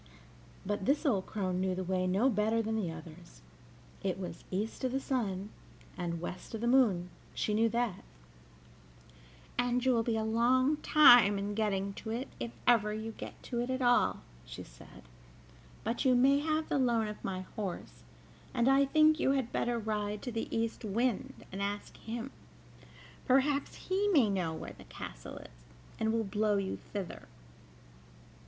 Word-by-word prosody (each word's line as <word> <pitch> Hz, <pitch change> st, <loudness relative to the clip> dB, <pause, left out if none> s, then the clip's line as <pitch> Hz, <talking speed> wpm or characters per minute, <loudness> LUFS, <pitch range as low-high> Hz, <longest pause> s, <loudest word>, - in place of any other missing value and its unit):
But 205 Hz, -1 st, -2 dB
this 290 Hz, +6 st, +2 dB
old 205 Hz, -10 st, +1 dB
crone 185 Hz, -3 st, -2 dB
knew 185 Hz, -1 st, 0 dB
the 185 Hz, -, -3 dB
way 185 Hz, 0 st, 0 dB
no 195 Hz, +8 st, +3 dB
better 220 Hz, -1 st, +2 dB
than 220 Hz, +1 st, -2 dB
the 195 Hz, -7 st, -1 dB
others 160 Hz, -, -12 dB, 0.6 s
it 190 Hz, -2 st, -1 dB
was 185 Hz, -2 st, -7 dB
east 205 Hz, +7 st, -3 dB
of 255 Hz, -, +1 dB
the 270 Hz, -, +1 dB
sun 210 Hz, -8 st, -2 dB, 0.4 s
and 170 Hz, -2 st, -3 dB
west 180 Hz, +5 st, -6 dB
of 220 Hz, -, -5 dB
the 235 Hz, -, 0 dB
moon, 210 Hz, -9 st, +3 dB, 0.2 s
she 210 Hz, -, 0 dB
knew 225 Hz, +2 st, +3 dB
that, 235 Hz, -4 st, -1 dB, 1.6 s
"and 245 Hz, +1 st, +1 dB
you 260 Hz, -, +4 dB
will 230 Hz, -, +3 dB
be 225 Hz, 0 st, 0 dB
a 220 Hz, -, 0 dB
long 255 Hz, +6 st, +3 dB
time 245 Hz, -10 st, +7 dB
in 200 Hz, +1 st, -3 dB
getting 200 Hz, -2 st, -1 dB
to 220 Hz, -, -7 dB
it, 240 Hz, +5 st, -3 dB
if 235 Hz, -, -3 dB, 0.2 s
ever 215 Hz, -3 st, +4 dB
you 220 Hz, +1 st, -4 dB
get -, -, -10 dB
to 240 Hz, -, -3 dB
it 245 Hz, -, -3 dB
at 260 Hz, 0 st, -1 dB
all," 245 Hz, -, +3 dB, 0.2 s
she -, -, -9 dB
said; -, -, -15 dB, 0.8 s
"but 230 Hz, +3 st, -1 dB
you 255 Hz, -2 st, +4 dB
may 270 Hz, +3 st, +5 dB
have 310 Hz, +1 st, 0 dB
the -, -, 0 dB
loan 235 Hz, -4 st, +2 dB
of 210 Hz, 0 st, -8 dB
my 185 Hz, -1 st, -3 dB
horse, 200 Hz, -4 st, -5 dB, 0.5 s
and 240 Hz, 0 st, +2 dB
I 270 Hz, +1 st, +5 dB
think 310 Hz, +2 st, +4 dB
you 270 Hz, -, +3 dB
had 265 Hz, -4 st, -1 dB
better 240 Hz, 0 st, 0 dB
ride 210 Hz, -2 st, -2 dB
to 250 Hz, -, -4 dB
the 225 Hz, 0 st, -3 dB
East 230 Hz, 0 st, -2 dB
Wind, 245 Hz, +5 st, -1 dB
and 195 Hz, +1 st, -5 dB
ask 205 Hz, +1 st, -3 dB
him: 235 Hz, +4 st, -6 dB, 1.0 s
perhaps 275 Hz, +2 st, +2 dB
he 390 Hz, +2 st, -1 dB
may 275 Hz, -, +4 dB
know 180 Hz, -4 st, -1 dB
where 160 Hz, -, -7 dB
the -, -, -15 dB
castle -, -, -8 dB
is, -, -, -14 dB, 0.3 s
and 220 Hz, 0 st, +1 dB
will 225 Hz, 0 st, +1 dB
blow 210 Hz, +1 st, +1 dB
you 195 Hz, -1 st, -2 dB
thither. 200 Hz, -4 st, -6 dB
220 Hz, 175 wpm, -32 LUFS, 195-250 Hz, 1.6 s, time